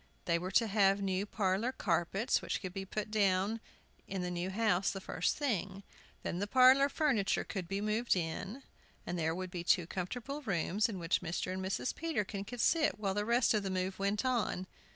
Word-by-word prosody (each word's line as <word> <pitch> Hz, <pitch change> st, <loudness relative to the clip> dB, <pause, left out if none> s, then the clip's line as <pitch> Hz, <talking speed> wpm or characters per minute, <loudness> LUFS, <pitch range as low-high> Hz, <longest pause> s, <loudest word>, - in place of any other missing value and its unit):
They 170 Hz, -1 st, +2 dB
were 180 Hz, +2 st, -4 dB
to 230 Hz, -, +5 dB
have 200 Hz, -2 st, +3 dB
new 195 Hz, 0 st, -1 dB
parlor 205 Hz, +4 st, 0 dB
carpets, 195 Hz, +3 st, 0 dB
which -, -, -2 dB
could 185 Hz, -2 st, -6 dB
be 195 Hz, 0 st, -4 dB
put 210 Hz, +2 st, -4 dB
down 200 Hz, +1 st, +2 dB, 0.5 s
in 190 Hz, -2 st, -3 dB
the 180 Hz, -, -2 dB
new 175 Hz, +1 st, -2 dB
house 200 Hz, -2 st, +2 dB
the 195 Hz, -, -4 dB
first 180 Hz, -2 st, -1 dB
thing. 200 Hz, -, -2 dB, 0.4 s
Then 175 Hz, -, -2 dB
the 205 Hz, -, -1 dB
parlor 260 Hz, +4 st, +6 dB
furniture 265 Hz, -10 st, +1 dB
could 190 Hz, -5 st, -5 dB
be 195 Hz, +2 st, -2 dB
moved 215 Hz, +2 st, +1 dB
in, 190 Hz, +9 st, -4 dB, 0.4 s
and 175 Hz, 0 st, -3 dB
there 160 Hz, 0 st, 0 dB
would 185 Hz, 0 st, -5 dB
be 175 Hz, -1 st, -4 dB
two 175 Hz, 0 st, +3 dB
comfortable 245 Hz, -, -4 dB
rooms, 200 Hz, -, 0 dB
in 205 Hz, -, -4 dB
which 170 Hz, 0 st, 0 dB
Mr. 180 Hz, +1 st, -2 dB
and 190 Hz, 0 st, -4 dB
Mrs. 190 Hz, +6 st, -1 dB
Peterkin 210 Hz, -11 st, -2 dB
could 245 Hz, +2 st, -5 dB
sit 310 Hz, +2 st, +3 dB
while 200 Hz, -2 st, -1 dB
the 205 Hz, +1 st, -1 dB
rest 235 Hz, +2 st, +3 dB
of 215 Hz, -, +2 dB
the 195 Hz, -, -3 dB
move 185 Hz, +1 st, -2 dB
went 200 Hz, +4 st, 0 dB
on. 235 Hz, -7 st, 0 dB
195 Hz, 200 wpm, -33 LUFS, 185-225 Hz, 0.5 s, parlor